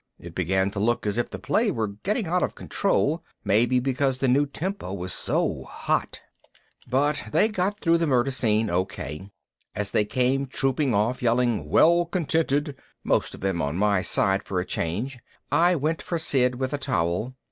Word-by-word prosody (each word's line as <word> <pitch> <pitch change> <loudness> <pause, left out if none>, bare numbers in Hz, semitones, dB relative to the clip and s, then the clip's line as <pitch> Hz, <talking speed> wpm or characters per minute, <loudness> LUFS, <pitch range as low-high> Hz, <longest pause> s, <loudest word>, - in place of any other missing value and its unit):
It 85 -1 -11
began 95 +2 0
to 100 - -4
look 115 +2 0
as 105 +2 0
if 120 - -1
the - - -6
play 210 - +1
were 110 - -1
getting 195 - -2
out 180 +2 0
of - - -1
control, 170 -5 0 0.2
maybe 120 +5 +3
because 135 +1 0
the 135 - 0
new 140 +3 +3
tempo 180 - -4
was 95 -1 -3
so - - -1
hot. - - -2 0.7
But 145 +2 +1
they 215 - +3
got 205 0 -1
through 170 -3 +3
the 165 - +1
Murder 130 -1 +2
Scene 110 -4 +1
okay. 90 -2 -3 0.5
As 105 0 -2
they 105 - +2
came 130 +4 0
trooping 135 -1 0
off, 110 +5 0
yelling 120 -8 +1
"Well 170 - +5
contented," 160 -4 0 0.3
most - - 0
of - - -14
them 95 -2 -1
on 70 +4 -2
my 100 -1 +2
side 95 +1 +2
for 95 - -3
a 90 - -2
change, 110 +13 -3 0.3
I 170 +5 +4
went 155 +2 -1
for 170 - -3
Sid 125 -5 +1
with 130 +2 -3
a 145 - -1
towel. 90 +2 -1
125 Hz, 180 wpm, -25 LUFS, 100-150 Hz, 0.7 s, Well